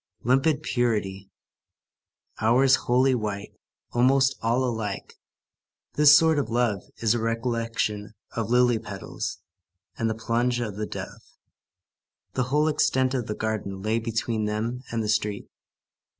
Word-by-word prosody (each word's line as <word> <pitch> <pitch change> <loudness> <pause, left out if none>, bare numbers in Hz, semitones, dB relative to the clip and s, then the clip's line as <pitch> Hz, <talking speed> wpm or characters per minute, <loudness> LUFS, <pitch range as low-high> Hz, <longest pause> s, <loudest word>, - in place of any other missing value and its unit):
Limpid 135 +5 +2
purity. 105 -7 -1 1.1
Hours 130 +4 +5
wholly 130 +2 +2
white; 105 -4 -3 0.4
almost 130 +2 +3
all 120 +3 +1
alike. 110 -5 -4 0.8
This 150 0 +8
sort 160 -2 +3
of 140 - -2
love 115 -4 +1 0.2
is 110 -1 +4
a 120 - -1
recollection 115 -2 -2 0.2
of 115 -2 -2
lily 125 -1 +3
petals 100 -3 -6 0.6
and 115 -1 +1
the 110 - -2
plumage 120 +2 0
of 110 -4 -3
the 105 0 -3
dove. - - -7 1.1
The 125 - 0
whole 150 +4 +2
extent 130 -4 +2
of 125 -4 -2
the 105 - -3
garden 100 -3 -3
lay 110 +2 +1
between 115 -1 -2
them 110 +4 -2
and 115 -1 -1
the - - -3
street. 105 -1 -1
115 Hz, 135 wpm, -25 LUFS, 110-125 Hz, 1.1 s, This